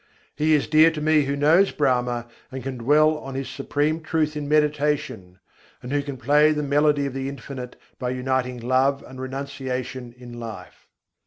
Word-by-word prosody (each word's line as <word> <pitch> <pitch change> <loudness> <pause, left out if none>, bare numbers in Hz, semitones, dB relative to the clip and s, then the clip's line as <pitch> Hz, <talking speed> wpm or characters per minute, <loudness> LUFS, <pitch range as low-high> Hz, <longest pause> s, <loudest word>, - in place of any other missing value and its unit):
He 155 +1 +3
is 145 - +1
dear 155 +1 +6
to 160 -2 -5
me 155 -1 +3
who 140 +1 -1
knows 160 +7 +4
Brahma, 125 -4 0 0.3
and 130 -1 -6
can 130 -1 -5
dwell 150 +5 +3
on 135 -2 -8
His 135 -1 -3
supreme 145 +4 -1
truth 155 -1 -1
in 145 -1 -4
meditation; 150 -10 0 0.5
and 125 - -6
who 145 0 +1
can 140 -2 -6
play 145 +5 +4
the 150 0 -2
melody 145 0 +2
of 140 - -4
the 135 0 -3
Infinite 130 -2 -8 0.2
by 125 - -2
uniting 125 0 -1
love 130 +3 +1
and 130 0 -9
renunciation 130 -2 -5
in 120 -1 -10
life. 110 -6 -9
140 Hz, 175 wpm, -23 LUFS, 125-150 Hz, 0.5 s, dear